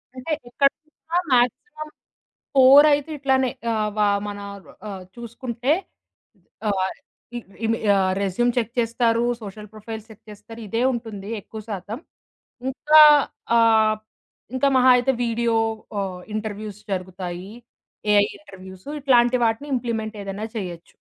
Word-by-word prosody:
అంటే, 260 +5 -6 0.2
ఇక్కడనుంచ 310 +5 -1
మాక్సిమం 305 - 0 0.7
కోరయితే 285 +3 +6
ఇట్లానే 265 -2 +2 0.2
ఆహ్, 215 -1 0
వా 210 -1 +3 0.2
మన 205 0 -5 0.5
ఆహ్, 190 -2 -7
చూసుకుంటే 235 +2 -3 1.0
ఆహ్, 190 -1 0 0.4
ఇ - - -3 0.3
ఇమి 225 0 0 0.2
ఆహ్, 190 -1 +2
రెస్యూమ్ 240 +6 +1
చెక్ 230 0 -1
చేస్తారు, 230 0 +1 0.2
సోషల్ 210 0 -9
ప్రొఫైల్ 220 0 -8
చెక్ 220 +1 -15
చేస్తారు, 210 +3 -12
ఇదే 230 +5 -1
ఉంటుంది 215 -4 -6
ఎక్కువ 220 +2 -9
శాతం. 210 +5 -5 0.7
ఇంకా 305 +3 +5 0.6
ఆహ్, 220 -1 +4 0.6
ఇంకా 275 +2 +2
మహా 255 0 +6
అయితే 250 +2 +2
వీడియో 230 0 0 0.5
ఆహ్, 185 -2 -5
ఇంటర్వ్‌వ్యూస్ 210 -1 -5
జరుగుతాయి. 185 0 -6 0.6
ఏఐ 205 0 +5
ఇంటర్వ్‌వ్యూస్ 190 -5 -13
ఇట్లాంటి 250 -2 +4
వాటిని 225 +6 -1
ఇంప్లిమెంట్ 225 -3 -3
ఏదైనా 200 +2 -5
చేయొచ్చు. 175 -4 -7
225 Hz, 115 wpm, -23 LUFS, 205-250 Hz, 1.0 s, కోరయితే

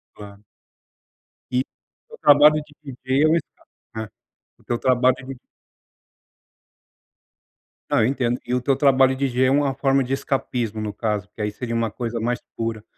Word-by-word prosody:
Claro. 100 0 -12 1.1
E 125 0 +1 0.5
o 465 - -12
trabalho 150 +1 +6
de 150 - -21
viver 135 +1 0
o 155 - +3
resultado 165 -2 -4 0.3
é, 110 -1 -4 0.5
porque - - -7
o 120 - 0
trabalho 130 0 +3
ele 130 0 -9 2.5
Ah, - - +3
eu - - +3
entendo. 125 -2 0
E 125 - -2
o 125 - +1
teu 135 +2 +1
trabalho 135 -1 +4
DJ 130 -1 +1
é - - +3
uma 140 0 +2
forma 135 0 +1
de 125 - -5
escapismo, 125 -5 -2
no 105 -1 -3
caso, 105 -3 -2
porque, 105 - -18
aí, 105 0 -1
seria 115 +3 -5
uma 115 -1 0
coisa 115 +1 -4
mais 120 +2 -1 0.2
pura. 115 -2 -4
125 Hz, 160 wpm, -22 LUFS, 115-135 Hz, 2.5 s, trabalho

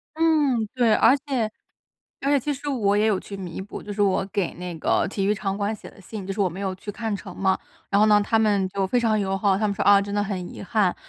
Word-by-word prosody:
嗯， 295 -8 +2
对。 235 -4 +4
而 240 +6 +5
且 265 -6 -2 0.7
而 275 - +1
且 285 - +4
其 295 +4 -2
实 285 +2 -7
我 205 -7 +1
也 215 +1 +3
有 205 -4 +2
去 200 - -8
弥 185 -2 -6
补， 195 +2 -8
就 205 - -6
是 205 - -5
我 195 -1 +2
给 190 -4 -1
那 180 0 -6
个 - - +1
体 195 -1 -2
育 210 - +3
场 195 -1 -3
馆 205 +1 -1
写 - - -11
的 - - -18
信， 195 +1 -8
就 195 - -3
是 205 - -4
我 190 - +3
没 180 +3 -8
有 190 -2 -2
去 205 +2 -7
看 225 0 -3
成 200 - -8
嘛， 190 -1 +1 0.3
然 200 - +3
后 215 - +6
呢， 210 -1 +5
他 225 - +2
们 205 -3 +2
就 195 0 -1
非 245 - +1
常 225 -3 +2
友 195 -1 -1
好， 195 -1 +2
他 215 - +1
们 200 - -1
说： - - -2
“啊， 200 -1 +7
真 200 0 -4
的 205 - +1
很 185 -3 -4
遗 - - -8
憾。” 200 -2 +1
205 Hz, 300 characters per minute, -24 LUFS, 195-225 Hz, 0.7 s, 啊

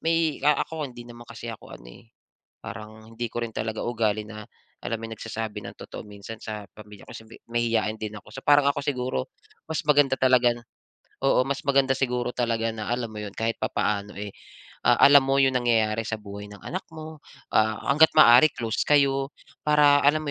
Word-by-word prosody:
may, 165 -2 0
ah, 150 +1 +3
ako 155 -3 -5
hindi 120 -1 -11
naman 120 0 -13
kasi 115 0 -7
ako 110 - -12
ano, - - -19
eh, 110 - -17 0.6
parang 110 +1 -10
hindi 120 +1 -3
ko 120 - -3
rin 115 - -7
talaga 110 0 -3
ugali 110 -3 -1
na, 110 -1 -9 0.4
alam 115 - -2
mo 115 - -7
yun, - - -7
nagsasabi 110 -1 -5
ng - - -12
totoo - - -8
minsan 105 +2 -10
sa 105 -1 -6
pamilya 105 -1 -14
ko - - -9
kasi 110 - -10 0.3
mahiyain 115 -2 0
din 110 -1 -5
ako. - - -17
So, 135 - -7
parang 145 0 +6
ako 145 - -2
siguro 125 - -2 0.4
mas 160 +1 -1
maganda 145 -3 +4
talaga 125 -2 +4
na 120 - -12 0.6
oo, 130 -2 +4
mas 140 0 -3
maganda 135 -1 +3
siguro 125 -2 -1
talaga 115 -2 0
na, 110 -1 -6
alam 120 -2 -2
mo 105 - -9
yun, 100 -1 -8
kahit 115 0 -2
papaano, 105 0 -2
eh, 105 0 -5 0.6
alam 140 0 +7
mo 135 0 +2
yung 130 -1 +3
nangyayari 115 -2 +1
sa 115 - -2
buhay 100 0 -9
ng 105 - -12
anak 185 - -5
mo. 155 0 -9 0.3
Ah, 110 0 +2
hangga't 160 +2 +5
maaari 125 -1 +8
close 115 -2 -2
kayo. 135 -1 +2 0.4
Para 145 -1 +5
alam 150 +2 +3
mo 145 - -3
120 Hz, 200 wpm, -25 LUFS, 110-140 Hz, 0.6 s, maaari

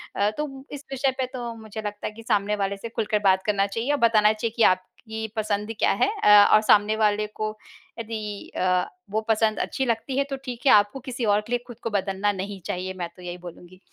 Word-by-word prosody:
अ, 200 +1 +2
तो 270 -3 -5
इस 285 -1 -8
विषय 270 0 +1
पे 260 - +1
तो 240 -2 -4
मुझे 220 0 -7
लगता 205 0 -4
है - - -5
कि 230 +1 -12
सामने 210 -3 +1
वाले 200 -1 -2
से 230 +4 -7
खुलकर 215 -1 -1
बात 190 0 +3
करना 200 -2 +2
चाहिए 225 +7 -2
और 290 - +2
बताना 215 -1 +4
चाहिए 220 +1 -3
कि 230 - +4
आपकी 220 +4 -8
पसंद 210 0 -1
क्या - - +3
है, - - +2
अ, 210 -1 +8
और 215 - +7
सामने 210 0 +4
वाले 210 -1 +1
को 215 0 -5 0.4
यदि 215 -2 -6
अ, 180 0 +2 0.2
वो 215 +2 0
पसंद 220 -1 +2
अच्छी 265 - -1
लगती 240 +3 -1
है 280 - +3
तो 275 - -2
ठीक 245 0 -6
है 270 - +7
आपको 205 +6 +4
किसी 250 -2 -4
और 205 0 +3
के - - -10
लिए 245 - +2
खुद 240 -2 -11
को - - -1
बदलना 200 0 0
नहीं 200 0 -5
चाहिए। 185 +1 -3
मैं 175 -2 -5
तो - - -15
यही 180 0 -6
बोलूँगी। 180 +1 -12
215 Hz, 235 wpm, -25 LUFS, 200-230 Hz, 0.4 s, अ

